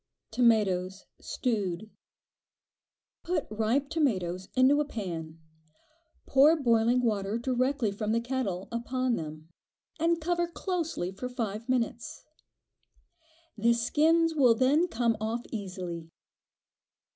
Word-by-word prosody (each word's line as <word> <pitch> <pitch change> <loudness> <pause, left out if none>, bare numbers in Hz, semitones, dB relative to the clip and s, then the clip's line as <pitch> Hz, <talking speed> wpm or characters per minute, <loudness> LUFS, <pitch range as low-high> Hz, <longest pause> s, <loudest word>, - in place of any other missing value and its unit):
Tomatoes 200 -5 +2
(stewed). 210 -4 -2 1.3
Put 345 -3 -1
ripe 225 +6 0
tomatoes 190 - -1
into 265 +3 +5
a - - -1
pan, 170 - -6 0.9
pour 285 +4 +5
boiling 240 -3 +2
water 210 -2 0
directly 255 -1 0
from 210 +1 -3
the 230 - +2
kettle, 235 -7 -3
upon 250 +1 -1
them, 155 -1 -7 0.5
and 335 +1 +2
cover 345 +1 0
closely 335 - -3
for 225 +6 -6
five 230 -1 -4
minutes. 235 -2 -2 1.3
The 230 +2 +3
skins 320 +8 +2
will 255 -7 +5
then 280 +8 +3
come 235 -6 +1
off 225 +2 -2
easily. 180 -6 -6
235 Hz, 105 wpm, -29 LUFS, 200-270 Hz, 1.3 s, into